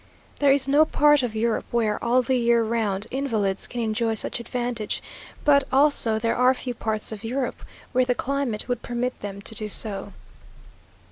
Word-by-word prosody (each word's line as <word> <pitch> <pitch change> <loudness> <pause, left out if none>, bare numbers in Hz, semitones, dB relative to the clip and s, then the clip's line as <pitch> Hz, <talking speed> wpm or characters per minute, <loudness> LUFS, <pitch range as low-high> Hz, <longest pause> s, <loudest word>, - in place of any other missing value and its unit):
There 285 -1 +4
is 275 -1 +4
no 290 +3 +5
part 295 -2 +4
of 240 -3 -3
Europe 225 +1 0
where, 220 -3 0
all 245 +2 +3
the 260 +2 0
year 235 -1 +3
round, 215 -3 -1
invalids 220 -8 -1
can 245 - -4
enjoy 225 0 0
such 220 - -2
advantages; 240 -2 -3 0.5
but, 280 -2 +5
also, 270 -5 +4
there 230 +1 0
are 250 +1 +4
few 250 -1 -4
parts 220 -2 -2
of 215 0 -7
Europe 255 +3 -3 0.3
where 255 0 +3
the 250 -1 0
climate 270 -6 -2
would 245 -2 -2
permit 245 +1 -3
them 200 -1 -7
to - - -5
do 215 -1 -4
so. 205 -1 0
235 Hz, 180 wpm, -24 LUFS, 220-255 Hz, 0.5 s, no